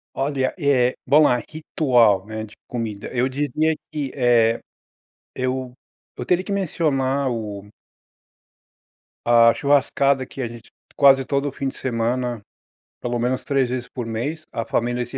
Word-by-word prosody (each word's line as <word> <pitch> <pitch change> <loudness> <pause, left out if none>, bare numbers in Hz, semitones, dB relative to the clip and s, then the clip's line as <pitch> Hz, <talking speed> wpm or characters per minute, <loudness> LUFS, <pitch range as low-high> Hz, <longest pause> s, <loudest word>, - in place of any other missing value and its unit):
Olha, 135 -1 -1
eh, 130 -4 +3
bom 150 +1 +6
a 125 - +4
ritual, 120 - +2
né, 110 0 -5
de 105 - -11
comida 110 -4 -4
eu 125 +1 +1
diria 145 +3 0 0.2
que, 145 -4 -3
eh, 120 -3 +3 0.8
eu 130 0 -2 0.4
eu - - -5
teria 180 +1 +2
que 200 - -6
mencionar 140 -8 0
o 105 -3 -5 1.6
a 115 -1 +6
churrascada 140 -1 +2
que 135 - -8
a 120 - -1
gente 115 -1 -12 0.2
quase 135 -1 +6
todo 140 +2 -1
o - - -3
fim 135 +1 -4
de 135 - -5
semana, 120 -1 -1 0.6
pelo 120 0 -2
menos 125 +2 -1
3 135 -3 +1
vezes 125 -1 -3
por 125 - -6
mês, 140 +8 -4
a 115 - -3
família 120 +2 -1
se 120 +3 -7
130 Hz, 150 wpm, -22 LUFS, 120-140 Hz, 1.6 s, bom